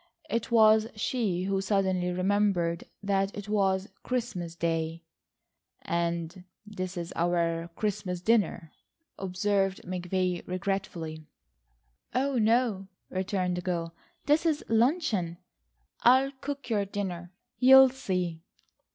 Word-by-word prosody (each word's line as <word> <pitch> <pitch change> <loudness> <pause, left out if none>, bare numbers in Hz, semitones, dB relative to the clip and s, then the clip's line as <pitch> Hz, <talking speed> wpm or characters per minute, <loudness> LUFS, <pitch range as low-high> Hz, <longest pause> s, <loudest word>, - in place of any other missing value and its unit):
It 230 0 -1
was 220 -1 +5
she 210 -5 -1
who 195 0 0
suddenly 190 -2 +1
remembered 185 -2 +1 0.2
that 195 0 0
it 205 0 -6
was 195 -2 +1
Christmas 205 -10 -3
day. 165 0 -2 0.8
"And 170 +1 -2 0.2
this 185 -3 -5
is 170 -1 -5
our 170 -1 0
Christmas 200 -4 -2
dinner," 200 -5 +1 0.5
observed 195 +1 0
McVay 180 0 -1
regretfully. 180 -5 -3 0.9
"Oh, 265 0 +1
no," 220 -3 +2 0.2
returned 185 -1 -1
the - - -2
girl, 170 -2 -3 0.3
"this 300 +3 +3
is 315 -3 0
luncheon. 225 - +1 0.6
I'll 260 +3 +5
cook 285 0 -5
your 205 -2 +2
dinner. 180 -3 -5 0.3
You'll 265 +1 +9
see." 180 -10 -3
190 Hz, 110 wpm, -28 LUFS, 175-215 Hz, 0.9 s, You'll